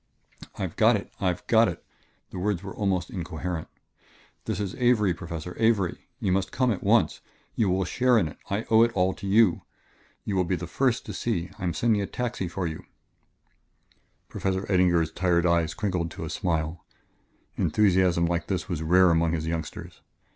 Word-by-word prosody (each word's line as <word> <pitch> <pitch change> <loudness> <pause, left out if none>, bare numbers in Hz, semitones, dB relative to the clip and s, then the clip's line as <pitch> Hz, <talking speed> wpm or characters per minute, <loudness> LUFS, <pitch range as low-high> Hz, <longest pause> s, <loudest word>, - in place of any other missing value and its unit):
"I've - - -4
got - - +5
it - - -5
I've 90 -2 -1
got 115 0 +5
it!" 85 -3 -5 0.5
The 90 - -6
words 100 -1 -1
were 95 - -6
almost 95 -4 -1
incoherent. 85 -1 -4 0.8
"This - - -2
is 100 -3 -3
Avery, 115 -7 +3
Professor 85 0 -7
Avery! 110 -6 +1
You 95 - 0
must 95 0 0
come 130 -2 +1
at 100 - -3
once. 100 -4 +2 0.3
You 105 -4 +1
will 95 +1 +1
share 125 +4 +2
in 95 -7 +2
it; 75 - -11
I 100 +3 -1
owe 110 0 +7
it 115 0 +4
all 95 -1 +2
to 100 - -8
you... 105 -2 +4 0.6
you 100 - -2
will 95 - +3
be 90 +1 0
the 90 - -5
first 125 +7 0
to - - -6
see... 95 -6 -2
I - - -7
am 85 - -1
sending 110 -3 +2
a 100 - -2
taxi 120 -6 -3
for 90 +1 -3
you 80 -2 -5 0.7
" - - -41
Professor 95 0 -2
Eddinger's 85 -3 +3
tired 90 -1 +1
eyes 85 -2 +2
crinkled 90 -5 -1
to - - -7
a - - -6
smile. 80 -2 -2 0.7
Enthusiasm 95 -4 +3
like 85 0 -1
this 95 -3 -2
was 85 -5 -3
rare 90 +2 +5
among 80 0 +2
his 80 -1 -2
youngsters. 80 -1 -5
90 Hz, 185 wpm, -26 LUFS, 85-105 Hz, 0.8 s, owe